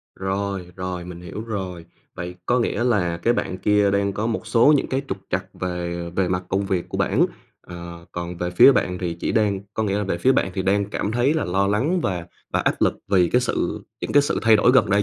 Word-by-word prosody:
Rồi, 95 Hz, -1 st, -3 dB
rồi 90 Hz, -1 st, -4 dB
mình 90 Hz, -1 st, -9 dB
hiểu 90 Hz, +4 st, -7 dB
rồi. 95 Hz, -6 st, -5 dB, 0.3 s
Vậy 90 Hz, 0 st, -6 dB
có 125 Hz, +1 st, +3 dB
nghĩa 120 Hz, 0 st, 0 dB
là 90 Hz, -8 st, +1 dB
cái 120 Hz, -, +3 dB
bạn 95 Hz, -5 st, -2 dB
kia 105 Hz, -1 st, +3 dB
đang 100 Hz, 0 st, +1 dB
có 105 Hz, +3 st, -2 dB
một 115 Hz, -1 st, -3 dB
số 115 Hz, +7 st, +5 dB
những -, -, -1 dB
cái 135 Hz, +1 st, -1 dB
trục 95 Hz, -, -3 dB
trặc -, -, -1 dB
về 85 Hz, -1 st, -4 dB
về 95 Hz, -2 st, +2 dB
mặt 90 Hz, 0 st, -1 dB
công 95 Hz, +1 st, 0 dB
việc 95 Hz, -3 st, -1 dB
của -, -, -4 dB
bản, -, -, +3 dB, 0.3 s
ờ, 85 Hz, -1 st, -9 dB
còn 85 Hz, 0 st, -5 dB
về 90 Hz, +1 st, -2 dB
phía 90 Hz, +10 st, +7 dB
bạn 90 Hz, -7 st, 0 dB
thì 85 Hz, -2 st, -3 dB
chỉ -, -, -1 dB
đang 105 Hz, -3 st, +1 dB
có 110 Hz, -, 0 dB
nghĩa 100 Hz, -1 st, 0 dB
là 105 Hz, -, -1 dB
về 85 Hz, -2 st, -2 dB
phía 130 Hz, +8 st, +4 dB
bạn 95 Hz, -, +1 dB
thì 95 Hz, -, -1 dB
đang 100 Hz, +1 st, +1 dB
cảm 105 Hz, -, -2 dB
thấy 125 Hz, +6 st, +2 dB
là 160 Hz, -, 0 dB
lo 95 Hz, +2 st, +1 dB
lắng 135 Hz, -, +1 dB
và 90 Hz, -, -2 dB, 0.3 s
và -, -, +2 dB
áp -, -, +1 dB
lực -, -, +3 dB
vì 90 Hz, -3 st, +4 dB
cái 125 Hz, -, +4 dB
sự 125 Hz, -, -2 dB, 0.2 s
những -, -, -4 dB
cái 145 Hz, -, +6 dB
sự 145 Hz, -, -1 dB
thay 110 Hz, -1 st, +6 dB
đổi 120 Hz, -, +4 dB
gần 115 Hz, -, +4 dB
đây 100 Hz, +1 st, +4 dB
95 Hz, 250 wpm, -23 LUFS, 90-110 Hz, 0.3 s, phía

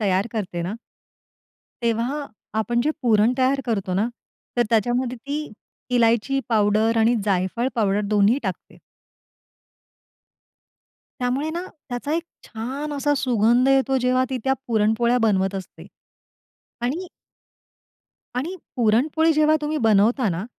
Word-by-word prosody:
तयार 195 Hz, -1 st, +1 dB
करते 185 Hz, -6 st, -3 dB
ना 180 Hz, +5 st, -3 dB, 1.1 s
तेव्हा 235 Hz, +6 st, -1 dB, 0.3 s
आपण 235 Hz, +2 st, 0 dB
जे 305 Hz, -, +2 dB
पुरण 225 Hz, -1 st, +4 dB
तयार 265 Hz, +1 st, +2 dB
करतो 200 Hz, -5 st, -1 dB
ना, 205 Hz, +5 st, +1 dB, 0.5 s
तर 240 Hz, -, +4 dB
त्याच्यामध्ये 240 Hz, +3 st, +1 dB
ती 285 Hz, +3 st, -5 dB, 0.4 s
इलायची 235 Hz, +3 st, +2 dB
पावडर 215 Hz, 0 st, +2 dB
आणि 225 Hz, +2 st, +4 dB
जायफळ 195 Hz, +5 st, 0 dB
पावडर 205 Hz, -3 st, +1 dB
दोन्ही 210 Hz, +4 st, +3 dB
टाकते. -, -, -6 dB, 2.4 s
त्यामुळे 260 Hz, +5 st, -1 dB
ना, 340 Hz, +2 st, -3 dB, 0.3 s
त्याचा 245 Hz, +4 st, -3 dB
एक 335 Hz, -, 0 dB, 0.2 s
छान 265 Hz, +7 st, -5 dB
असा 290 Hz, +1 st, +1 dB
सुगंध 240 Hz, 0 st, +3 dB
येतो, 270 Hz, 0 st, +3 dB
जेव्हा 255 Hz, +1 st, +2 dB
ती 260 Hz, -, -1 dB
त्या 265 Hz, 0 st, +2 dB
पुरणपोळ्या 225 Hz, +2 st, +2 dB
बनवत 195 Hz, -4 st, +1 dB
असते. 190 Hz, -1 st, -8 dB, 1.0 s
आणि 310 Hz, +10 st, -2 dB, 1.3 s
आणि 310 Hz, +9 st, -2 dB, 0.2 s
पुरणपोळी 265 Hz, +8 st, +3 dB
जेव्हा 310 Hz, 0 st, +4 dB
तुम्ही 300 Hz, +1 st, -2 dB
बनवता 220 Hz, +3 st, +3 dB
ना, 175 Hz, +2 st, -2 dB
240 Hz, 120 wpm, -23 LUFS, 215-270 Hz, 2.4 s, पुरण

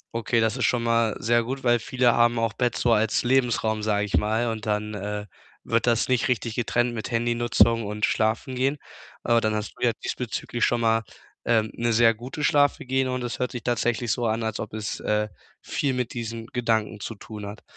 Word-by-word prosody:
Okay, 115 Hz, +1 st, +1 dB
das 110 Hz, +3 st, +1 dB
ist 125 Hz, -, +1 dB
schon 120 Hz, -2 st, +1 dB
mal 115 Hz, -1 st, +2 dB
sehr 120 Hz, +1 st, +2 dB
gut, 130 Hz, +3 st, -5 dB
weil 120 Hz, -1 st, +3 dB
viele 125 Hz, +1 st, +2 dB
haben 120 Hz, 0 st, +3 dB
auch 115 Hz, -1 st, 0 dB
Bett 125 Hz, -2 st, 0 dB
so 120 Hz, -1 st, +3 dB
als 110 Hz, +1 st, +2 dB
Lebensraum, 120 Hz, -4 st, +1 dB
sage 105 Hz, -1 st, +1 dB
ich 100 Hz, -, -1 dB
mal, 110 Hz, +3 st, +1 dB
und 110 Hz, 0 st, -6 dB
dann, 105 Hz, 0 st, -1 dB
äh, 105 Hz, +1 st, -4 dB, 0.4 s
wird 115 Hz, +1 st, 0 dB
das 115 Hz, -1 st, +2 dB
nicht 130 Hz, -1 st, +2 dB
richtig 120 Hz, -2 st, -1 dB
getrennt 120 Hz, +1 st, 0 dB
mit 110 Hz, 0 st, -5 dB
Handy-Nutzung 115 Hz, -1 st, +2 dB
und 105 Hz, +1 st, 0 dB
Schlafengehen. 130 Hz, +6 st, 0 dB, 0.5 s
Aber 115 Hz, -1 st, +3 dB
dann 110 Hz, 0 st, 0 dB
hast 105 Hz, 0 st, -4 dB
du -, -, -7 dB
ja 120 Hz, -, +4 dB
diesbezüglich 120 Hz, 0 st, -3 dB
schon 120 Hz, -1 st, +2 dB
mal, 115 Hz, 0 st, +3 dB, 0.4 s
ähm, 110 Hz, -2 st, +2 dB
'ne 115 Hz, 0 st, 0 dB
sehr 115 Hz, 0 st, +5 dB
gute 130 Hz, +7 st, -7 dB
Schlafhygiene 130 Hz, -3 st, +2 dB
und 125 Hz, -1 st, -2 dB
es 120 Hz, -, -4 dB
hört 125 Hz, -, -2 dB
sich 120 Hz, -3 st, -5 dB
tatsächlich 120 Hz, -1 st, 0 dB
so 120 Hz, -2 st, 0 dB
an, 110 Hz, +1 st, -1 dB
als 110 Hz, -1 st, -3 dB
ob 110 Hz, 0 st, -5 dB
es, 105 Hz, -1 st, -4 dB
äh, 105 Hz, 0 st, 0 dB, 0.3 s
viel 135 Hz, -3 st, -1 dB
mit 125 Hz, -2 st, -2 dB
diesen 115 Hz, -1 st, -5 dB
Gedanken 110 Hz, -3 st, -1 dB
zu 115 Hz, -, -6 dB
tun 105 Hz, 0 st, -8 dB
hat. 105 Hz, -, -9 dB
115 Hz, 205 wpm, -25 LUFS, 110-120 Hz, 0.5 s, sehr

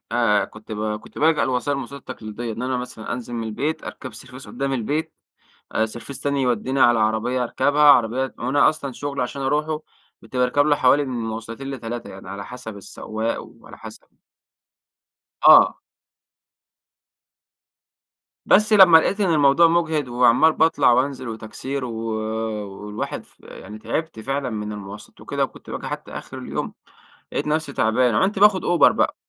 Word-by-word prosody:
آآ، 115 Hz, -4 st, +2 dB
كنت 110 Hz, +1 st, -12 dB
ب 105 Hz, 0 st, -2 dB
كنت -, -, -13 dB
بالجأ 160 Hz, +1 st, +3 dB
للوسائل 130 Hz, +3 st, -1 dB
المواصلات 140 Hz, +1 st, -7 dB
التقليدية. 110 Hz, +2 st, -6 dB
إن 115 Hz, -, -6 dB
أنا 130 Hz, 0 st, -1 dB
مثلًا 125 Hz, -3 st, -6 dB
أنزل 120 Hz, 0 st, -6 dB
من 115 Hz, -1 st, -3 dB
البيت، 140 Hz, +9 st, -3 dB
أركب 130 Hz, -4 st, -8 dB
سرڤيس 130 Hz, 0 st, -10 dB
قدام 135 Hz, 0 st, -3 dB
البيت، 150 Hz, +6 st, -2 dB, 0.6 s
آآ 110 Hz, -, +1 dB
سرڤيس 120 Hz, +5 st, -8 dB
تاني 140 Hz, -1 st, 0 dB
يوديني 125 Hz, +2 st, 0 dB
على 120 Hz, -3 st, +5 dB
عربية 110 Hz, +4 st, 0 dB
أركبها، 145 Hz, +5 st, +1 dB
عربية 130 Hz, -2 st, +4 dB
وأنا 130 Hz, +4 st, +3 dB
أصلًا 140 Hz, -3 st, -5 dB
شغلي 140 Hz, +1 st, -4 dB
عشان 135 Hz, +3 st, -5 dB
أروحه 150 Hz, +3 st, -1 dB, 0.4 s
كنت 115 Hz, +3 st, -13 dB
باركب 125 Hz, +3 st, +2 dB
له 150 Hz, -, +3 dB
حوالي 140 Hz, +1 st, +3 dB
من 125 Hz, -2 st, -4 dB
مواصلتين 115 Hz, +4 st, -6 dB
ل3، 120 Hz, -2 st, -6 dB
يعني 95 Hz, 0 st, -11 dB
على 100 Hz, 0 st, -6 dB
حسب 125 Hz, -4 st, -9 dB
السواق 110 Hz, +3 st, -4 dB
وعلى -, -, -15 dB
حسب -, -, -11 dB, 1.4 s
آه. -, -, +7 dB, 2.7 s
بَس 215 Hz, +2 st, +4 dB
لمّا 185 Hz, -5 st, +9 dB
لقيت 200 Hz, +5 st, 0 dB
إنّ 180 Hz, -4 st, +2 dB
المَوضوع 145 Hz, +3 st, +5 dB
مُجهِد، 160 Hz, -4 st, 0 dB
وعمّال 125 Hz, +6 st, +4 dB
باطْلَع 145 Hz, -5 st, +3 dB
وأنْزِل 130 Hz, 0 st, 0 dB
وتَكْسير 125 Hz, +4 st, -5 dB
و 120 Hz, -, -5 dB, 0.9 s
والواحِد 105 Hz, +1 st, -5 dB
ف -, -, -25 dB
يعني 105 Hz, -, -11 dB
تعِبْت 160 Hz, 0 st, -4 dB
فعلًا 135 Hz, +3 st, -2 dB
مِن 105 Hz, -1 st, -4 dB
المواصَلات 105 Hz, 0 st, -10 dB
وكده، -, -, -2 dB
وكنتْ -, -, -7 dB
باجي -, -, -5 dB
حتى -, -, -6 dB
آخر -, -, -8 dB
اليوم، -, -, -5 dB, 0.6 s
لَقيت -, -, -2 dB
نفسي 150 Hz, -2 st, -1 dB
تَعبان، 115 Hz, +1 st, +2 dB
عنت 195 Hz, +1 st, +1 dB
باخُد 205 Hz, -2 st, +5 dB
أوبَر 175 Hz, -2 st, +5 dB
بقى. -, -, 0 dB
130 Hz, 155 wpm, -22 LUFS, 115-145 Hz, 2.7 s, لمّا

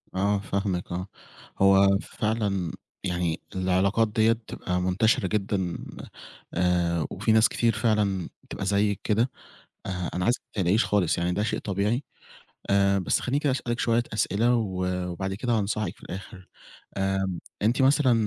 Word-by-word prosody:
آه 100 Hz, +1 st, +2 dB
فاهمِك 100 Hz, -3 st, -2 dB
آه، 90 Hz, +2 st, -3 dB, 0.5 s
هو 100 Hz, 0 st, +6 dB
فعلًا 105 Hz, -6 st, -1 dB, 0.3 s
يعني 90 Hz, -3 st, -1 dB
العلاقات 95 Hz, +4 st, +2 dB
دِيّة 110 Hz, +1 st, +3 dB
بتبقى 90 Hz, -5 st, -4 dB
منتشرة 95 Hz, +2 st, +2 dB
جدًا 95 Hz, -3 st, -1 dB, 0.8 s
آآ 85 Hz, -2 st, +1 dB
وفي 110 Hz, -, 0 dB
ناس 110 Hz, +1 st, +5 dB
كتير 115 Hz, -2 st, +1 dB
فعلًا 105 Hz, -4 st, +1 dB
بتبقى 95 Hz, -, -6 dB
زيِّك 100 Hz, 0 st, +1 dB
كده 115 Hz, +4 st, +1 dB, 0.5 s
آآ، 90 Hz, -2 st, -3 dB
أنا 90 Hz, -, -1 dB
عايزِك 120 Hz, +2 st, +1 dB
ما 100 Hz, -, -4 dB
تقلقيش 100 Hz, +6 st, +3 dB
خالص 95 Hz, -6 st, +1 dB
يعني 85 Hz, +1 st, 0 dB
ده 105 Hz, +4 st, 0 dB
شيء -, -, -1 dB
طبيعي 105 Hz, +7 st, -1 dB, 0.7 s
آآ، 100 Hz, 0 st, +4 dB
بس 95 Hz, -, +1 dB
خلّيني 135 Hz, +3 st, 0 dB
كده 145 Hz, -, +1 dB
أسأل 125 Hz, -2 st, -2 dB
لِك 120 Hz, -, -3 dB
شوية 115 Hz, 0 st, +2 dB
أسئلة 110 Hz, +3 st, +2 dB
و 95 Hz, -5 st, -1 dB, 0.3 s
وبعد 95 Hz, +2 st, -3 dB
كده 120 Hz, +3 st, -2 dB
هانصحِك 105 Hz, -3 st, -1 dB
في -, -, -23 dB
الآخر. 95 Hz, 0 st, -9 dB, 0.5 s
آمم، 95 Hz, -2 st, 0 dB, 0.2 s
أنتِ 120 Hz, +5 st, +2 dB
مثلًا 135 Hz, -1 st, +4 dB
100 Hz, 150 wpm, -26 LUFS, 95-110 Hz, 0.8 s, هو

